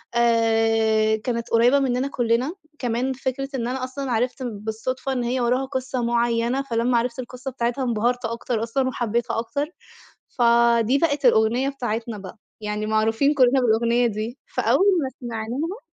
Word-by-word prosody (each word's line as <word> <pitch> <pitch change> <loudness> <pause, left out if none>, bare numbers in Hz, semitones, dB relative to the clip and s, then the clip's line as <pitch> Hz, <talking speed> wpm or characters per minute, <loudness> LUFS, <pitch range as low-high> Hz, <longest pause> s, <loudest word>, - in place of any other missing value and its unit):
آآ 225 -2 +3
كانت 235 +1 -3
قريّبة 240 +4 +5
مننا 260 0 0
كُلّنا، 245 +4 0 0.3
كمان 245 +2 -1
فكرة 270 +1 -3
إن 240 -2 -2
أنا 255 +1 -3
أصلًا 260 +1 -4
عرفت 245 +3 -1
بالصُدفة 225 +4 -4
إن 250 -2 -1
هي 250 +2 -1
وراها 250 +3 +1
قصة 260 -2 -3
معيّنة، 235 +2 +1
فلما 240 -2 0
عرفت 235 +1 -1
القصة 255 +1 -6
بتاعتها 240 +1 -2
انبهرت 240 +1 0
أكتر 230 0 -2
أصلًا 260 +3 0
وحبيتها 235 -1 -1
أكتر. 285 +6 -2 0.7
فدي 235 +1 +4
بقت 285 -2 0
الأغنية 240 +3 +3
بتاعتنا 235 -4 -4
بقى، 195 +2 -10 0.2
يعني 210 0 -3
معروفين 220 +6 +2
كُلّنا 265 -2 +4
بالأغنية 235 +1 +2
دي 225 +4 -4 0.2
فأول 390 - +3 0.2
ما 265 - -2
سمعناها 245 - -4
240 Hz, 145 wpm, -23 LUFS, 230-260 Hz, 0.7 s, قريّبة